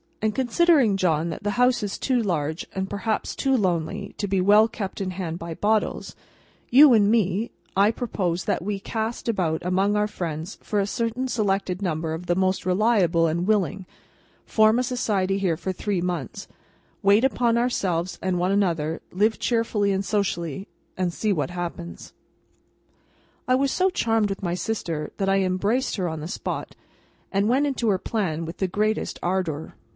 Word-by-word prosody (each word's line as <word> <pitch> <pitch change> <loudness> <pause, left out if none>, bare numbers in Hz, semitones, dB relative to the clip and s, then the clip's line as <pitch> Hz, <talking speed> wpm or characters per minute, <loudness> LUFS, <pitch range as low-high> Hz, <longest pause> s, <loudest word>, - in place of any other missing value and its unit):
And 215 -1 +1
considering, 265 - +3
John, 170 -3 +1
that - - -5
the 205 - 0
house 250 -1 +4
is 205 -2 -3
too 255 -3 +1
large, 160 -5 -2
and 190 0 -2
perhaps 215 +2 -2
too 270 -1 +1
lonely, 190 0 -1
to 205 - -1
be 195 0 0
kept 185 +1 +1 0.5
well - - -1
in 185 - -3
hand 175 -2 -4
by 170 0 -5
Bottles, 215 +3 0 0.5
you, 275 +2 +8
and 205 -3 +4
me, 215 -1 +1 0.2
I 200 +2 +5
propose 185 -7 -2
that - - -1
we 200 0 -2
cast 220 +4 -4
about 175 -8 0
among 190 +3 +1
our 210 0 +2
friends 170 -3 -5
for 210 - -1
a 200 - +1
certain 235 +4 -2
selected 195 -5 -1
number 160 -3 -2
of 165 +2 -6
the 175 - +2
most 185 0 0
reliable 185 -4 +3
and 170 +3 0
willing—form 215 +2 0
a - - +1
Society 205 -7 0
here 180 -5 0
for 185 +3 -3
three 190 0 -2
months—wait 180 - -2
upon 240 -3 +2
ourselves 185 -8 0
and 185 -1 0
one 180 +2 +1
another—live 185 +3 0
cheerfully 225 -4 +1
and 195 0 -1
socially—and 180 -2 -3
see 210 +2 0
what 145 -6 -1
happens." 175 -1 -6 1.3
I 255 - +4
was 275 +1 +1
so 375 +1 +2
charmed 225 - +1
with 195 0 -5
my 175 -2 -1
sister, 170 -6 -3
that 195 -1 0
I 195 0 +3
embraced 200 +7 0
her 185 -3 -1
on 160 -2 -4
the 155 - -5
spot, - - -5 0.6
and 200 +2 +1
went 270 +4 +3
into 250 -5 0
her 190 -2 +2
plan 170 -8 -2
with 165 +1 -7
the 190 - 0
greatest 215 +4 -1
ardour. 175 -4 -2
195 Hz, 170 wpm, -24 LUFS, 175-220 Hz, 1.3 s, you